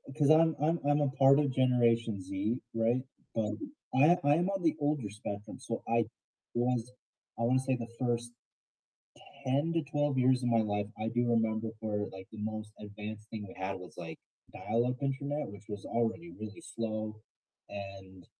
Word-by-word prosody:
'cause 145 -2 +3
I'm 160 +1 +6
I'm 165 +3 +3
I'm 145 0 +4
a 140 - +3
part 135 +1 +6
of 145 -3 +2
Generation 115 -5 +3
Z, 100 +6 -1 0.2
right? 115 +3 +3 0.3
But 105 -2 0 0.4
I 155 +7 +7
I 145 +1 +5
am 175 +3 +2
on 195 -2 -1
the 160 -1 +4
older 145 -7 0
spectrum, 105 0 -6
so 115 -3 -4
I 115 -1 +3 0.5
was 120 0 +1 0.5
I - - +1
wanna 130 +2 +4
say 130 0 +1
the 115 -2 -4
first 120 -1 0 1.1
10 140 +6 +2
to 165 - +2
12 145 -2 +1
years 130 0 +4
of 120 - +2
my 115 - +5
life, 105 -1 0
I 110 - -1
do 120 +1 +1
remember 110 -1 +2
where 105 -2 -1
like 95 0 -9
the 110 - -9
most 110 0 -3
advanced 105 +1 -7
thing 110 -2 -5
we - - -11
had 95 +1 -1
was 90 -1 -11
like 80 -2 -7 0.3
dial-up 120 +4 0
internet, 140 +2 -1
which 100 +1 -10
was 105 -1 -6
already 120 +9 -1
really 110 0 -7
slow, 110 -1 -2 0.5
and 95 -2 -8
115 Hz, 175 wpm, -32 LUFS, 105-135 Hz, 1.1 s, I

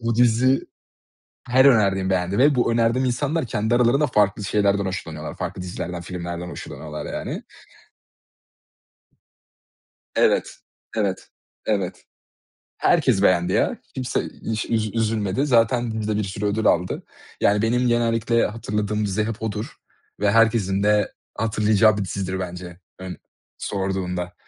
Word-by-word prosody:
bu 115 -1 -1
dizi 125 +2 +4 0.9
her 130 +2 +5
önerdiğim 100 -7 +4
beğendi 95 +2 0
ve 145 +2 +5
bu 120 -2 +2
önerdiğim 115 +3 +2
insanlar 145 +4 -1
kendi 110 +2 0
aralarında 125 +5 +3
farklı 105 -4 +1
şeylerden 100 -1 +2
hoşlanıyorlar, 80 -4 -5
farklı 90 - -5
dizilerden, 90 -1 -5
filmlerden 85 -1 -5
hoşlanıyorlar, 75 0 -7
yani. - - -5 2.7
Evet, - - +3 0.5
evet, 100 -4 -1 0.4
evet. 100 -4 -1 0.7
Herkes 95 - +3
beğendi 90 -2 +3
ya. - - +1 0.2
Kimse 125 -2 -1 0.3
hiç 110 -1 -1
üz 110 -2 0
üzülmedi. 110 +3 0
Zaten 120 -2 +2
dizi 110 -1 -3
de - - -1
bir 105 - 0
sürü 95 +2 -5
ödül 110 +2 0
aldı. 90 +2 +1 0.4
Yani, 105 +1 +3
benim 125 +2 +2
genellikle 115 0 +2
hatırladığım 105 -1 -2
dizi 100 +2 0
hep 110 0 -5
odur 110 0 -4 0.5
ve 105 - +3
herkesin 105 -3 +3
de 105 0 +2 0.2
hatırlayacağı 110 -1 +3
bir 100 - -1
dizidir 95 0 -3
bence 90 -1 -7 0.2
ön 95 -3 -7 0.4
sorduğunda. 95 -2 -3
105 Hz, 125 wpm, -23 LUFS, 95-115 Hz, 2.7 s, her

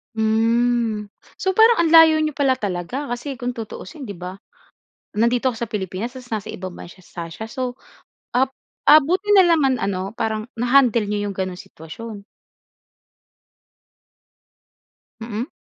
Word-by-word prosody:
Hmm. 225 0 +1 0.3
So, 380 -1 0
parang 450 +3 +6
ang - - +2
layo 325 -1 +8
n'yo 310 -1 0
pala 275 -2 +2
talaga, 205 +6 -3
kasi 260 +2 -6
kung 245 +1 -3
tutuusin, 230 +3 -8
'di 200 - -7
ba? 180 +2 -7 0.8
Nandito 240 +3 +2
ka 230 - -9
sa 235 - -2
Pilipinas, 205 +4 -4
ta's 250 -2 -11
nasa 215 -3 -3
ibang 185 0 -6
bansa 180 +1 -12
sa 170 -1 -7
siya 220 +7 -8
so, 255 -2 -3 0.6
ap 260 +1 +2 0.4
ah, 300 +2 +10
buti 375 +7 0
na 380 - +8
lang 335 -2 +4
man 265 -1 +3
ano, 195 -2 -2
parang 220 -1 -2 0.2
na-handle 245 -3 +3
n'yo 205 0 -1
'yong 200 -1 -4
gano'n 185 -1 -3
sitwasyon? 200 +6 -10 3.0
Mm. 225 +5 -4
230 Hz, 145 wpm, -21 LUFS, 205-265 Hz, 3.0 s, ah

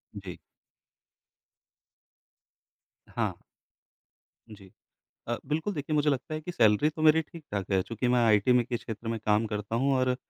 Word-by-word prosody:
जी। 95 -3 -8 2.7
हाँ। - - -3 1.1
जी। 100 -3 -13 0.6
अ, 120 - 0
बिल्कुल 160 +7 -2
देखिए 150 +1 -3
मुझे 150 0 +3
लगता 135 +3 -3
है 155 - -3
कि 180 +3 -6
सैलरी 110 +3 +4
तो 155 0 -7
मेरी 160 +1 +6
ठीक-ठाक 105 - -7
है 95 -1 +3
चूँकि 115 +4 -3
मैं 125 0 +3
आईटी 110 +2 +4
में 125 -1 +4
के 120 0 -2
क्षेत्र 115 0 -7
में 115 0 -2
काम 105 +1 +3
करता 105 +2 -3
हूँ 135 +3 +2
और 130 -1 +1
120 Hz, 150 wpm, -28 LUFS, 105-150 Hz, 2.7 s, मेरी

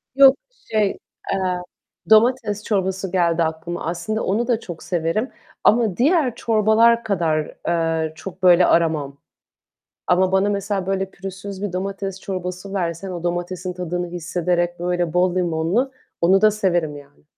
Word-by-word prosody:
Yok, 275 -1 +8 0.4
şey, 210 -2 +1 0.4
eee, 180 -2 -1 0.5
domates 220 -2 +3
çorbası 190 -2 -1
geldi 170 -2 +2
aklıma. 160 +1 -4
Aslında 175 +6 -2
onu 225 +5 0
da 235 -3 +1
çok 175 -6 -9
severim 175 +8 -1 0.3
ama 220 -5 +3
diğer 285 -2 +2
çorbalar 230 +1 +3
kadar, 165 -7 -1
eee, 165 -2 0
çok 185 +1 -10
böyle 180 0 +6
aramam 155 -4 +1 0.9
ama 185 +1 +3
bana 190 +1 +3
mesela 200 -1 -2
böyle 195 0 -1
pürüzsüz 195 0 -8
bir 205 - -3
domates 195 +1 -4
çorbası 185 +1 -5
versen, 175 +1 -2
o 175 -2 -5
domatesin 175 +1 -3
tadını 180 0 -3
hissederek 175 0 -1
böyle 175 -2 -1
bol 180 0 +2
limonlu 180 +9 0 0.3
onu 185 +3 +4
da 215 - +6
severim 175 -8 0
yani. 145 +1 -16
185 Hz, 140 wpm, -21 LUFS, 175-205 Hz, 0.9 s, Yok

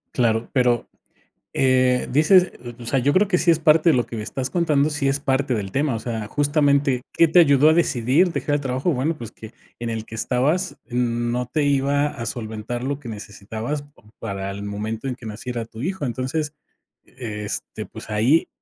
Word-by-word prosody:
Claro, 115 -2 +1
pero, 125 -3 +2 0.7
eh, 130 -1 +3
dices 180 +6 +5 0.3
o - - -10
o - - -8
sea, 135 - +2
yo 140 +3 +2
creo 200 +2 +4
que 180 -3 +2
sí 170 - +3
es 165 - +4
parte 155 +1 +4
de 150 - +5
lo 120 - +2
que 115 - -8
me 105 - -3
estás 130 +4 -4
contando, 155 -4 +2
sí 145 -2 0
es 135 +1 +1
parte 135 -2 0
del 100 -4 -3
tema. 140 -2 +1
O - - -2
sea, 110 -2 -4
justamente, 145 -2 +2
¿qué 165 - +5
te 165 +3 +4
ayudó 145 -2 +6
a - - +5
decidir 160 +2 +2
dejar 145 -1 0
el - - -3
trabajo? 135 +5 -1
Bueno, 150 +5 -1
pues 115 -5 -8
que 110 +1 -12 0.2
en 120 0 -4
el 110 -1 -3
que 115 - -11
estabas, 140 - 0
mm, 120 -1 0
no 125 0 -1
te 150 +4 -1
iba 140 +1 +2
a 115 -5 -6
solventar 115 +2 -4
lo 140 +1 -2
que 120 - -9
necesitabas 110 +6 -5
pa 145 -5 -21 0.2
para 100 -2 -4
el 100 +1 -6
momento 110 +5 -4
en 125 - -2
que 120 - -15
naciera 115 +2 -5
tu 110 0 -12
hijo. 180 +2 -2
Entonces, 135 +5 -2 0.5
e 105 -4 -6
este, - - -5
pues - - -11
ahí 115 +10 +3
130 Hz, 210 wpm, -22 LUFS, 115-145 Hz, 0.7 s, ayudó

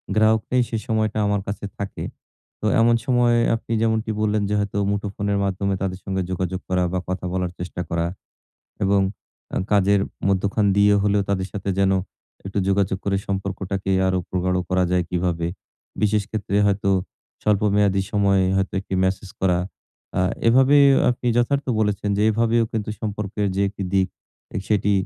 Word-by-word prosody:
গ্রাহক 110 0 +4
নেই, 125 0 +4
সেই 115 -2 -2
সময়টা 110 -2 0
আমার 100 -1 +1
কাছে 100 +1 -4
থাকে। 100 -1 -5 0.6
তো - - -3 0.2
এমন 115 +1 +5
সময়ে 120 -2 +3 0.2
আপনি 115 - -8
যেমনটি 110 0 +1
বললেন 105 -1 +1
যে, - - 0
হয়তো 100 0 -2
মুঠোফোনের 100 0 -2
মাধ্যমে 100 0 -1
তাদের 95 -1 -2
সঙ্গে 95 -1 -1
যোগাযোগ 95 0 -2
করা 90 -1 +2
বা 90 - +1
কথা 90 0 -3
বলার 90 -1 -1
চেষ্টা 90 0 -5
করা 85 0 0 0.8
এবং 100 +1 +3 0.5
আ - - +1
কাজের 100 0 +4 0.3
মধ্যখান 100 +2 +1
দিয়ে 100 0 +5
হলেও 105 0 +2
তাদের 95 -1 -1
সাথে 100 -1 -3
যেন 95 0 +3 0.5
একটু 95 +1 -3
যোগাযোগ 95 -1 +1
করে 100 -1 +1
সম্পর্কটাকে 95 0 -3 0.2
আরো 95 0 +1
প্রগাঢ় 90 0 0
করা 95 0 +3
যায় 90 -1 +2
কীভাবে? 85 -2 -1 0.6
বিশেষ 105 0 +2
ক্ষেত্রে 100 -2 -2
হয়তো 100 0 +1 0.5
স্বল্প 105 -1 +2
মেয়াদী 100 -2 +3
সময়ে 100 -2 +3
হয়তো 95 0 0
১ 95 - -5
টি - - -2
Message 95 0 -2
করা, 90 -2 +2 0.6
আ - - +3 0.3
এভাবে 135 +4 +5 0.3
আপনি 125 0 -4
যথার্থ 140 +4 +1
বলেছেন 105 -1 0
যে, 105 - +1
এভাবেও 115 +1 +2
কিন্তু 110 -1 -2
সম্পর্কের 105 -1 -2
যে 95 - 0
১ 100 - -4
টি 100 - -3
দিক, 95 -1 +3 0.6
সেটি 105 -1 +2
100 Hz, 165 wpm, -22 LUFS, 95-105 Hz, 0.8 s, এমন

